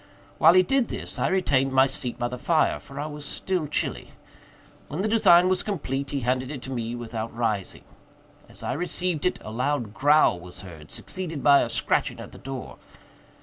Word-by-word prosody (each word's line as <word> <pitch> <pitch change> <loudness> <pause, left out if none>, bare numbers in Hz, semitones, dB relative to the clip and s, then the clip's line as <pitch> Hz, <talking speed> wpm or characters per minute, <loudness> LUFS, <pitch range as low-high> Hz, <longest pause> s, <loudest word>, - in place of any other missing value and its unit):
While 170 - +7
he 185 - +7
did 265 +3 +1
this, - - -5
I - - +2
retained 140 -8 +1
my 130 0 +6
seat 130 -2 -4
by 120 - -1
the 125 0 -6
fire, 160 +3 +2
for 140 -1 -10
I 145 - -2
was 150 -1 -7
still 175 +2 -2
chilly. 150 - -3 0.7
When 165 +7 -3
the - - +1
design 185 -5 +6
was 185 -1 +2
complete, 140 -9 -3
he 140 - -2
handed 130 +2 0
it 140 -4 -6
to 135 - -6
me 120 -2 -3
without 115 -1 -5
rising. 110 -5 -1 0.7
As - - -14
I - - -1
received 180 +1 -1
it, - - -1
a 110 - -7
loud 125 -2 -1
growl 145 -7 +4
was 90 +1 -9
heard, 80 -6 -11
succeeded 160 +6 -4
by 140 -1 +7
a - - -1
scratching - - 0
at - - -9
the - - -12
door. 135 -1 -7
140 Hz, 195 wpm, -25 LUFS, 120-170 Hz, 0.7 s, While